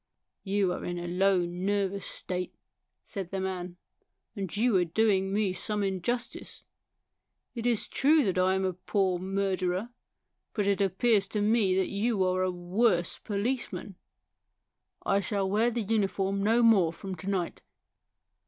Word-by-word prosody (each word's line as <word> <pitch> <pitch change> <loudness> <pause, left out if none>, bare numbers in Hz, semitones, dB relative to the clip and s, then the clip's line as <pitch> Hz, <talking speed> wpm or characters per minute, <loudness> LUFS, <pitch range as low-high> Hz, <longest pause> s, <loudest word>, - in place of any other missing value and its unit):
You 195 -2 +1
are - - -6
in 175 0 -3
a 175 0 -4
low, 185 +1 +3
nervous 195 +2 -1
state," 180 0 -5 0.5
said 195 -5 -5
the 195 - -3
man; 180 -2 -4 0.3
" - - -54
and 195 -2 -4
you 235 0 +3
are 180 - +3
doing 195 +2 +1
me 200 -2 +1
some 210 +2 -2
injustice. 195 +6 -3 0.9
It 235 -1 -2
is 235 -3 +1
true 300 +2 +4
that 185 -2 +1
I 185 +1 +3
am 190 0 0
a 185 - 0
poor 185 0 0
murderer; 190 +1 -1 0.7
but 205 - +1
it 200 -1 +1
appears 200 +2 +2
to 210 0 -2
me 210 -3 +3
that 190 -1 +1
you 205 0 +1
are 185 0 +1
a 185 - +1
worse 180 +1 +1
police 225 +5 -2
man." 190 +2 -7 0.6
" - - -37
I 200 - +3
shall 200 0 -1
wear 215 +5 +2
the 235 -1 -2
uniform 195 -2 0
no 225 +4 +3
more 200 -8 +5
from 190 +3 -7
to 185 +4 -5
night." 185 -4 -2
195 Hz, 160 wpm, -29 LUFS, 185-210 Hz, 0.9 s, more